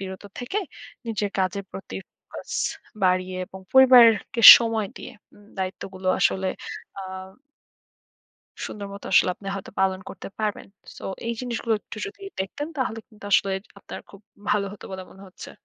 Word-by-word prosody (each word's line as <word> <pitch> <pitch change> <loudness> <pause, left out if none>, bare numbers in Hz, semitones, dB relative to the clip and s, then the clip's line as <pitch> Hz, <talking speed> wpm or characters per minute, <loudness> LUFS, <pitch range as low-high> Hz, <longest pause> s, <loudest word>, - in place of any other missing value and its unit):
বিরত 190 0 -7 0.2
থেকে, 250 +12 -2 0.5
নিজের 215 -3 -2
কাজের 190 +1 -1
প্রতি 195 - -8
focus - - -12 0.5
বাড়িয়ে 185 0 +1
এবং 190 +1 -11
পরিবারকে 245 -3 +6 0.2
সময় 225 -3 -1
দিয়ে, - - -9 0.5
দায়িত্বগুলো 185 0 -4
আসলে 190 0 +2 0.5
আ - - -5 1.6
সুন্দরমতো 200 -1 -8
আসলে - - +5
আপনি 195 - -14
হয়তো 195 - -7
পালন 190 -1 +1
করতে 190 - -9
পারবেন। 215 -2 -2 0.3
সো - - -11 0.2
এই 235 - 0
জিনিসগুলো 235 -2 -1
একটু - - -11
যদি 410 0 -11 0.2
দেখতেন 285 +11 -4
তাহলে 240 -4 -2
কিন্তু 215 -3 -17
আসলে 195 - +4 0.3
আপনার - - -9
খুব 200 - -15 0.3
ভালো 205 -1 +2
হতো 205 - -12
বলে 190 0 -6
মনে 195 - -15
হচ্ছে। 185 - -11
200 Hz, 140 wpm, -24 LUFS, 190-225 Hz, 1.6 s, পরিবারকে